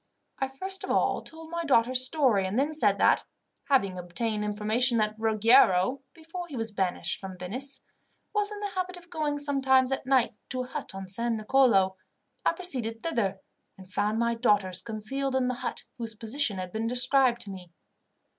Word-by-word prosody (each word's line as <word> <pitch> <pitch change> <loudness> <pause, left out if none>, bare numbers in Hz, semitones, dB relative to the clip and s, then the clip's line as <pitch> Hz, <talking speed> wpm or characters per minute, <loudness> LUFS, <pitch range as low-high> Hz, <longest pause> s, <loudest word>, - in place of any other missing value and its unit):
I 270 - 0
first 380 +9 -2
of - - -6
all - - +1
told 320 0 -11
my 340 0 -2
daughters' 255 -3 +3
story, 255 -9 +2
and 195 +4 -3
then 290 +4 +1
said 310 - +4
that, - - +3 0.4
having 195 -10 +1
obtained 210 +5 -2
information 215 +4 +1
that 215 -1 +1
Ruggiero, 220 +1 +3
before 335 +2 -8
he 285 -6 -7
was 225 -1 -3
banished 190 -3 -2
from 190 -1 -8
Venice, 250 +11 -4 0.5
was 415 -1 +1
in 415 0 -7
the 410 - -2
habit 365 -1 -4
of 345 -1 -16
going 300 -2 -1
sometimes 270 -2 +2
at 265 -1 -3
night 260 -3 +3 0.2
to 255 -1 -2
a - - -9
hut 265 -6 -6
on 195 0 -7
San 230 +4 +3
Nicolo, 215 -5 +3 0.5
I - - +2
proceeded 245 -11 +1
thither, 200 - -1 0.4
and 185 -1 -15
found 210 +2 0
my 235 0 +1
daughters 205 -6 +1
concealed 245 +6 -2
in 260 -1 +1
the - - -1
hut 250 - -4 0.2
whose 225 -2 -4
position 225 -1 -1
had 185 -1 -5
been 220 +3 -2
described 250 0 +2
to 200 - -5
me. 180 -3 -10
240 Hz, 185 wpm, -27 LUFS, 210-275 Hz, 0.5 s, said